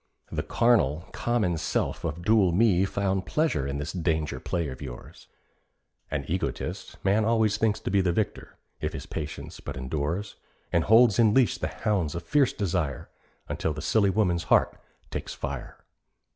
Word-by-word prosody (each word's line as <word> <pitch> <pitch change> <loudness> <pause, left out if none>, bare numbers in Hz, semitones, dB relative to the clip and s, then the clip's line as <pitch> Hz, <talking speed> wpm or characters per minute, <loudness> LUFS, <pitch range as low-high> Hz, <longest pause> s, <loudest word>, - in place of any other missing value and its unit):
The - - -1
carnal, 85 - +2
common 105 -9 0
self 80 - -1
of 85 +3 -3
dual 105 -4 +4
me 95 0 +4
Found 95 -1 -1
pleasure 150 - +1
in 70 +1 -3
this 75 +2 -4
danger 80 -4 -1
play 85 -3 -2
of 65 +2 -8
yours. 65 -4 -9 0.8
(An 70 -2 -2
egotist, 90 +4 -3
man 100 +3 +3
always 110 -2 +2
thinks 110 -1 +1
to - - -3
be 100 -1 +4
The 90 -2 +1
victor, 100 +3 -3 0.2
if - - -3
his - - -6
patience 75 -2 -6
but - - -7
endures, 75 +9 -3 0.4
And 85 -2 +3
holds 115 0 +6
in 110 -2 +5
leash 130 -3 +3
the - - -1
hounds 90 -8 -1
of 85 - -4
fierce 135 +9 +3
desire, 85 - -2 0.4
Until 80 - -2
the 75 - -6
silly 100 +5 +3
woman's 90 -4 +1
heart - - +3 0.4
takes - - -5
fire.) - - -5
90 Hz, 165 wpm, -27 LUFS, 80-110 Hz, 0.8 s, holds